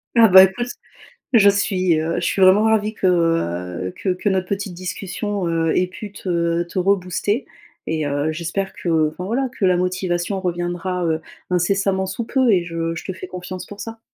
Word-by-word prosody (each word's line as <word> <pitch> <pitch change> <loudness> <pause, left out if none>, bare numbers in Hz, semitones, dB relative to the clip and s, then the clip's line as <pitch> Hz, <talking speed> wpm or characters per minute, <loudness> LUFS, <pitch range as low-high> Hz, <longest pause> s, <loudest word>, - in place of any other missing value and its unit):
Ah 230 -1 +7
bah 190 -1 +9
écoute 190 +6 0 0.7
je 205 -4 +7
suis, 185 -4 +1
heu, 165 +1 -1
je - - -2
suis 195 - 0
vraiment 190 +3 +6
ravie 220 -1 +2
que, 210 - -4
heu, 90 - 0
que - - -3
que 180 +3 -4
notre 185 -2 0
petite 200 -2 -3
discussion, 190 +2 -4
heu, 165 -1 +1
ait 180 - +2
pu 200 +2 -9
te 170 -3 -1
te 175 +2 -9
rebooster. 195 +4 0 0.4
Et 155 -1 -1
heu, 145 +2 -1
j'espère 175 +4 -3
que, 160 -3 +1
enfin, 160 +4 -7
voilà, 255 +6 0
que - - -4
la 185 -1 +4
motivation 180 +1 -1
reviendra, 175 0 -2
heu, 160 -1 0 0.3
incessamment 190 +2 +1
sous 190 +5 -4
peu 260 0 +2
et 185 -4 +3
je 165 -1 -3
je 160 - -6
te 190 - -3
fais 185 0 -8
confiance 180 0 -7
pour 205 - -11
ça. 225 0 -7
185 Hz, 190 wpm, -21 LUFS, 170-200 Hz, 0.7 s, bah